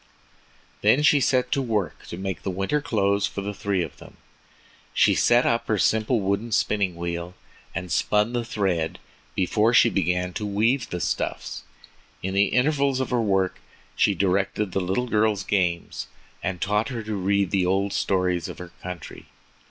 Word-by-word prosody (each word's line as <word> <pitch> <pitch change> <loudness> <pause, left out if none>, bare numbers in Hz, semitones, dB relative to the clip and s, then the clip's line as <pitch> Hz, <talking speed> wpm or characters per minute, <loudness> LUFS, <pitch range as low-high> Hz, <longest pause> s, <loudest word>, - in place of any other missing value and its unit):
Then 145 - +4
she 150 -1 +5
set 125 -1 +1
to 140 - +2
work 110 -7 -2
to 85 - -7
make 95 0 -4
the - - -3
winter 95 +11 -1
clothes 100 -8 +1
for 100 - -5
the 100 +1 -4
three 100 -3 -1
of 80 - -8
them. - - -14 0.8
She - - +5
set 120 +1 +4
up 115 0 +1
her 110 - +1
simple 110 +4 +2
wooden 100 +4 -1
spinning 100 -5 +1
wheel 85 +1 -4 0.4
and 90 0 -4
spun 105 +3 +2
the 120 -1 0
thread 95 -8 -1 0.4
before 105 +5 +2
she - - +6
began 90 0 0
to 105 - -4
weave 110 +6 +1
the 90 - -4
stuffs. - - -2 0.6
In 95 +1 -2
the 100 +1 +4
intervals 140 +1 +2
of 130 - -2
her 120 -1 +2
work 95 -3 +1 0.4
she - - +3
directed 95 +1 0
the 95 - 0
little 95 +7 0
girl's 105 -3 +1
games 90 -4 -1 0.3
and 95 -2 -3
taught 105 +4 0
her 120 -4 -4
to 110 0 -4
read 100 -1 +1
the 95 -3 +2
old 95 +2 +1
stories 90 -2 0
of - - -8
her 90 -1 -9
country. 90 -5 -8
100 Hz, 175 wpm, -25 LUFS, 90-115 Hz, 0.8 s, she